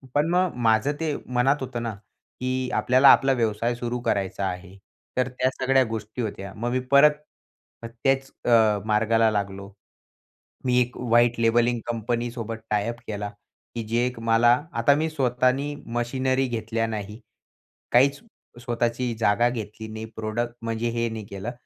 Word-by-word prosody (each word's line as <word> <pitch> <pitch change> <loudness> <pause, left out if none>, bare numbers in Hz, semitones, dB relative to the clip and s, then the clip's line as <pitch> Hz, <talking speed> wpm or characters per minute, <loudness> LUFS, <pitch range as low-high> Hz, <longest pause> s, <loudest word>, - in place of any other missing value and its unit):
पण 145 +2 +3
मग 180 0 +2
माझं 110 +5 +3
ते 155 -3 -1 0.2
मनात 130 +3 +4
होतं 125 -2 -4
ना, 115 -2 -3 0.5
की 130 0 -1
आपल्याला 130 +2 +5
आपला 135 0 +4
व्यवसाय 115 0 0
सुरू 120 0 -3
करायचा 100 -3 -1
आहे, 95 +1 -7 0.4
तर 130 -1 +2
त्या 125 0 0
सगळ्या 130 0 +3
गोष्टी 110 +2 -5
होत्या. 100 -3 -5
मग 120 +3 -3
मी 130 - +1
परत 140 +2 +7 0.7
त्याच 135 +4 -1 0.2
अ, 110 -3 +4
मार्गाला 110 +1 +3
लागलो. 100 -1 -4 0.9
मी 125 -1 +3
एक 125 0 -2
व्हाईट 120 0 +2
लेबलिंग 120 +1 +2
कंपनीसोबत 115 0 -3
टायअप 105 +3 -1
केला, 105 -1 -4 0.5
की 115 - -3
जे 120 +2 +1
एक 125 -2 -6
मला 115 +1 +5 0.2
आता 115 +4 +3
मी 160 +2 0
स्वतःनी 130 0 0 0.2
मशिनरी 130 +2 0
घेतल्या 115 -1 -2
नाही, 105 0 -6 0.7
काहीच 135 +3 +4 0.4
स्वतःची 120 +1 -1
जागा 110 +2 +3
घेतली 110 -2 -6
नाही, 110 0 -6
प्रोडक्ट 115 +2 -3
म्हणजे 115 +1 -2
हे 115 0 -1
नाही 110 -2 -6
केलं. 100 +3 -5
120 Hz, 145 wpm, -25 LUFS, 110-125 Hz, 0.9 s, परत